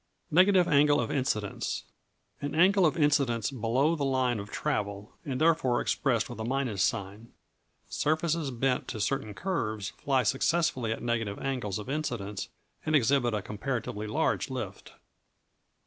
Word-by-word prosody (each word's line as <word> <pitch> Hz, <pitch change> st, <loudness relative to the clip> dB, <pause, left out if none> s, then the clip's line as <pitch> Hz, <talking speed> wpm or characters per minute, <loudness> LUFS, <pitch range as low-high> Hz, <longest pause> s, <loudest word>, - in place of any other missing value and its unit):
Negative 185 Hz, +2 st, +5 dB
Angle 145 Hz, 0 st, +4 dB
of 120 Hz, -, -1 dB
Incidence 110 Hz, -7 st, -2 dB, 0.6 s
An 145 Hz, +1 st, -3 dB
angle 185 Hz, +2 st, +5 dB
of 155 Hz, -, -1 dB
incidence 140 Hz, -6 st, +2 dB
below 130 Hz, +6 st, +1 dB
the 150 Hz, -, -2 dB
line 130 Hz, -4 st, +1 dB
of 100 Hz, 0 st, -7 dB
travel, 100 Hz, 0 st, -3 dB
and 130 Hz, -3 st, -3 dB
therefore 155 Hz, -7 st, +3 dB
expressed 120 Hz, -6 st, 0 dB
with 120 Hz, -, -9 dB
a -, -, -2 dB
minus 125 Hz, -4 st, -1 dB
sign. 100 Hz, +5 st, -2 dB, 0.6 s
Surfaces 155 Hz, 0 st, 0 dB
bent 130 Hz, +1 st, 0 dB
to 110 Hz, -, -5 dB
certain 110 Hz, -1 st, -1 dB
curves 110 Hz, -, -2 dB
fly 135 Hz, -2 st, 0 dB
successfully 135 Hz, -1 st, +1 dB
at 110 Hz, -, -4 dB
negative 115 Hz, -4 st, -1 dB
angles 125 Hz, -8 st, -2 dB
of 105 Hz, -, -7 dB
incidence, 120 Hz, -9 st, -3 dB, 0.3 s
and 155 Hz, 0 st, +1 dB
exhibit 120 Hz, -3 st, +3 dB
a 105 Hz, -, -3 dB
comparatively 110 Hz, -1 st, -4 dB
large 105 Hz, -, 0 dB
lift. -, -, -6 dB
130 Hz, 145 wpm, -29 LUFS, 110-145 Hz, 0.6 s, Negative